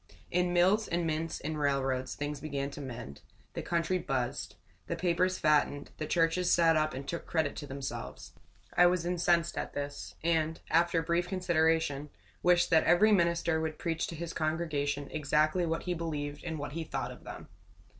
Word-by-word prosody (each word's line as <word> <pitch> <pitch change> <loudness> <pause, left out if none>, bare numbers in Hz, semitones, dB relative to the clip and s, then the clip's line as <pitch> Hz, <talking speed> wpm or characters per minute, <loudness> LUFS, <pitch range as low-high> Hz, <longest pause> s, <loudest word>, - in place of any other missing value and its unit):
In 180 0 +2
mills 185 +5 +3
and 170 0 -1
mints 160 0 -2
and 155 -1 -4
railroads, 135 -2 0
things 145 0 -4
began 140 -2 -3
to 145 - -8
mend. 115 - -7 0.3
The - - -3
country 170 +2 0
buzzed. 130 -6 -2 0.3
The - - -2
papers 185 +1 +1
fattened. 150 -2 +2
The 155 - -3
churches 175 +1 +2
sat 165 -1 +5
up 155 -1 +1
and 135 +1 -6
took 170 - -4
credit 160 -4 0
to 145 - -6
themselves. 135 0 -6 0.4
I 180 - +7
was 175 -1 +1
incensed 175 -1 +1
at - - -5
this; 145 0 -5
and, 160 -1 +1
after 170 0 +3
brief 170 +1 0
consideration, 160 -5 +1 0.3
wished 175 0 +4
that 160 -1 +5
every 215 +5 +5
minister 170 -3 +2
would 160 -1 -3
preach 165 -1 -1
to 165 - -6
his 165 +1 -5
congregation 150 -3 -1
exactly 155 +3 +1
what 165 0 -1
he 180 - -1
believed 150 -4 -4
and 160 -2 -3
what 145 0 -5
he 165 +3 -3
thought - - -4
of - - -12
them. - - -9
160 Hz, 175 wpm, -31 LUFS, 145-175 Hz, 0.4 s, I